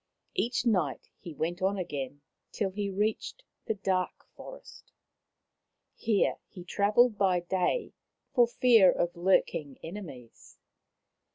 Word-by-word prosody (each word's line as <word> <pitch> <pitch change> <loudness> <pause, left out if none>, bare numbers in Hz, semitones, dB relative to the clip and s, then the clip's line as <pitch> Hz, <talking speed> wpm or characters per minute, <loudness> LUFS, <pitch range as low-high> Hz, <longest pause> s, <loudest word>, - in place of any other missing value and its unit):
Each 245 - 0
night 180 - 0
he 175 - -9
went 165 +4 -3
on 195 +2 +1
again, 145 -5 -5 0.3
till 200 -3 -2
he 200 +1 -3
reached 210 - -2 0.2
the 220 - 0
dark 190 -2 -2
forest. - - -12 1.0
Here 215 -3 +1
he 180 -4 -11
travelled 210 +4 +3
by 185 -3 +3
day, 185 - -1 0.4
for 245 -3 +5
fear 230 -5 +5
of 175 0 -1
lurking 170 -5 +1
enemies. 160 - -10
190 Hz, 115 wpm, -29 LUFS, 175-215 Hz, 1.0 s, for